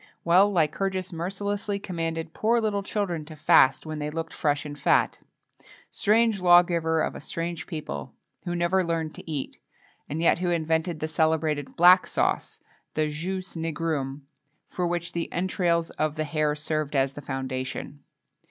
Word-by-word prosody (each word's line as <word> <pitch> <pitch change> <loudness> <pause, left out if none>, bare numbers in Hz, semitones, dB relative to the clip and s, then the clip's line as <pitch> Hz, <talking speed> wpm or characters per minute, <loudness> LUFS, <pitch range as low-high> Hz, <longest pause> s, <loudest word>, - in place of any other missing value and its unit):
Well, 185 +4 +5
Lycurgus 185 +2 0
mercilessly 200 +4 -2
commanded 165 -4 -4
poor 230 +2 +2
little 210 -3 0
children 195 -5 -2
to 155 0 -10
fast 145 -3 +4
when 155 -1 -5
they 150 0 -2
looked 165 +1 -5
fresh 145 -1 0
and 145 -1 -6
fat.[XXII - - +2 0.4
5] - - -23 0.2
Strange 220 -1 +2
law 175 -1 +8
giver 165 -2 0
of - - -2
a - - -8
strange 170 0 -4
people, 150 - -6 0.3
who 175 - -3
never 175 +2 +2
learned 165 -2 -2
to - - -11
eat, 145 -4 -4 0.5
and 150 - -3
yet 165 0 +3
who 180 -1 0
invented 160 0 0
the 155 - -1
celebrated 155 -2 0
"black 180 +2 +7
sauce," - - -1 0.3
the 155 -1 +1
jus 185 +5 -4
nigrum, 155 -4 -2 0.4
for 180 -1 -2
which 175 0 -3
the 170 -1 -3
entrails 170 -2 0
of 155 -1 -1
the 155 - -1
hare 150 0 0
served 155 -1 -2
as 135 0 +2
the 145 - -8
foundation. 135 +1 -4
165 Hz, 160 wpm, -26 LUFS, 155-180 Hz, 0.5 s, law